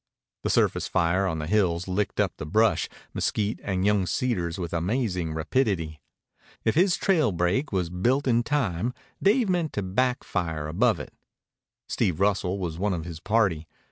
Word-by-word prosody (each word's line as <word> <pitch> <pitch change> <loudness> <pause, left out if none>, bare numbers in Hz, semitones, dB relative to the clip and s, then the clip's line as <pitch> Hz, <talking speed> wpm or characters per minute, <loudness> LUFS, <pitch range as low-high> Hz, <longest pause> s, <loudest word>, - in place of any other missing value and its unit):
The - - -2
surface - - +2
fire 90 +2 +1
on 80 -3 -1
the 75 - -3
hills 90 -2 +1
licked 95 +2 -1
up - - +1
the - - -5
brush, 110 +7 +2 0.2
mesquite, 105 0 -1
and 95 -1 -1
young 100 -3 +2
cedars 90 -11 -1
with 85 -3 -4
amazing 90 -3 -1
rapidity. 80 - -1 0.6
If 110 - +3
his 180 +2 +3
trail 160 - +2
break 90 - 0
was 90 -4 -1
built 120 +10 +1
in 120 -2 +3
time, 120 - -1 0.3
Dave 215 +4 +3
meant 175 -4 0
to 105 - -2
back 125 +7 0
fire 80 -5 -2
above 105 +5 +2
it. - - -8 0.7
Steve 85 -3 0
Russell 95 -1 +1
was 85 -4 -4
one 100 0 +1
of 80 -1 -5
his 85 -2 -7
party. 95 -7 +1
95 Hz, 170 wpm, -26 LUFS, 85-120 Hz, 0.7 s, If